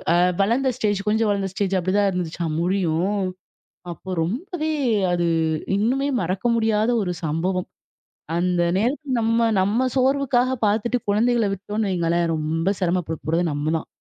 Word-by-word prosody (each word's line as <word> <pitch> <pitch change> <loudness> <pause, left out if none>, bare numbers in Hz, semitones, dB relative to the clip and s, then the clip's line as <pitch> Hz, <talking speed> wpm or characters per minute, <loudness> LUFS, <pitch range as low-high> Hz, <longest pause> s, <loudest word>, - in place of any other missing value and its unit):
அ - - +4 0.2
வளர்ந்த 250 +6 +2
ஸ்டேஜ் 205 -4 0
கொஞ்சம் 220 0 +2
வளர்ந்த 195 -1 -1
ஸ்டேஜ் 195 -1 -1
அப்பிடிதான் 195 +3 +2
இருந்துச்சா 170 -2 -3
முடியும்! 185 +2 0 0.7
அப்ப 185 +2 -6
ரொம்பவே 310 - -3 0.4
அது 175 -1 +1 0.5
இன்னுமே 255 +7 +1
மறக்க 185 +5 -3
முடியாத 220 0 +1
ஒரு 180 -2 -2
சம்பவம் 180 +4 -1 0.7
அந்த 175 0 +1 0.2
நேரத்தில் 260 +3 -1
நம்ம, 230 +1 +2 0.2
நம்ம 205 +6 +1
சோர்வுக்காக 260 -1 +2
பார்த்துட்டு 225 +4 +1
குழந்தைகள 230 0 +2
விட்டோன்னு 205 +1 -3
வைங்களேன்! 170 -1 +1
ரொம்ப 160 +4 -1
சிரமப்பட 175 -3 0
போறது 165 +3 +1
நம்ம 145 +2 -1
தான். - - -10
200 Hz, 135 wpm, -22 LUFS, 175-230 Hz, 0.7 s, அ